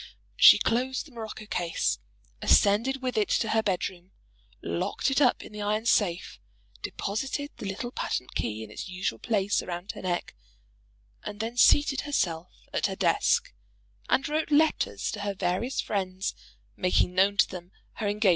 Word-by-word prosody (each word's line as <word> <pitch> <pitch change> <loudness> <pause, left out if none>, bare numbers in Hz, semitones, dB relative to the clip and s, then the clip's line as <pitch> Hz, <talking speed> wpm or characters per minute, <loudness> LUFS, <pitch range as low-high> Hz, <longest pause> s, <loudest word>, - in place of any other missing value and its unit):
She - - +9
closed 255 +3 0
the 300 - -15
morocco 220 -2 -7
case, 175 -5 -1 0.4
ascended 230 +6 +3
with 250 -3 0
it 210 - 0
to 225 - -1
her 220 - +3
bed 195 -4 0
room, 180 0 -14 0.5
locked 85 - -1
it 270 - +2
up 250 -3 +3
in - - -11
the 210 0 -7
iron 210 +2 -1
safe, 190 -6 +1 0.4
deposited 270 +8 -3
the 205 - -6
little 220 +5 -4
patent 125 - -3
key 110 0 -3
in 105 - -11
its 145 - -7
usual 180 -11 -3
place 205 -3 +1
round 175 +2 -5
her - - -10
neck, 180 -2 -2 0.9
and 205 - -7
then 225 +2 -3
seated 285 +3 +5
herself 180 - -1 0.2
at - - +1
her - - -4
desk, 475 +1 +2 0.6
and 270 - +2
wrote 310 +2 -1
letters 290 - +2
to 210 - -6
her 200 -1 -3
various 190 +8 -1
friends, 190 -2 -2 0.4
making 180 0 +1
known 195 +2 +3
to - - +5
them 180 0 -9 0.2
her 215 - -3
engagement. 205 0 +2
205 Hz, 165 wpm, -27 LUFS, 185-245 Hz, 0.9 s, She